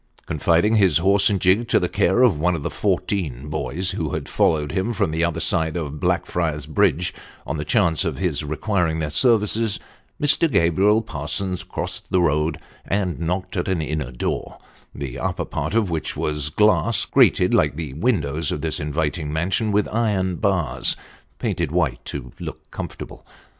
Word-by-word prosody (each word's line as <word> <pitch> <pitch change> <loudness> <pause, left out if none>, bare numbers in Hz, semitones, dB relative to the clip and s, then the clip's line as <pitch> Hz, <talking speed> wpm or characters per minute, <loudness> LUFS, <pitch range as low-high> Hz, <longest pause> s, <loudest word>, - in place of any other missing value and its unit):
Confiding 85 +8 +2
his 95 -7 +5
horse 100 +5 +4
and 100 -2 0
gig 95 +6 +3
to - - +3
the 90 - 0
care 95 +5 +2
of 100 -12 +4
one 90 +2 +2
of 75 - -5
the - - -3
fourteen 75 -9 -2
boys 80 +5 -1
who 80 -7 -3
had - - -4
followed 75 -2 +1
him 100 +5 -1
from 95 - 0
the 80 +1 0
other 85 -2 0
side 80 0 +1
of 75 -3 -4
Blackfriars 75 -2 -1
Bridge 80 +3 +1 0.3
on 80 - -3
the 75 - -3
chance 85 -1 +2
of - - -2
his 85 -5 -1
requiring 80 +2 -1
their 80 -2 -2
services, 110 - +2 0.4
Mr. 150 +2 +4
Gabriel 100 +6 +3
Parsons 85 +2 -2
crossed - - -5
the 95 - +2
road 80 -1 +1 0.3
and 95 -3 -1
knocked 90 +3 -3
at 85 - -1
an 95 -3 0
inner 75 -4 -3
door, - - -3 0.4
the 65 -3 -5
upper - - -2
part - - -3
of 105 -6 +1
which 80 -3 -3
was 75 -1 -1
of 75 - -8
glass, 105 +1 +3
grated - - +4
like - - +3
the 80 -4 -5
windows 80 - 0
of 75 - -3
this 80 -2 -1
inviting 75 +1 -2
mansion 90 +7 0
with 105 0 +2
iron 100 -6 0
bars - - +1 0.4
painted 85 -4 -2
white 80 -6 0
to 65 -3 -6
look - - -8
comfortable. - - -7
85 Hz, 175 wpm, -22 LUFS, 75-100 Hz, 0.4 s, his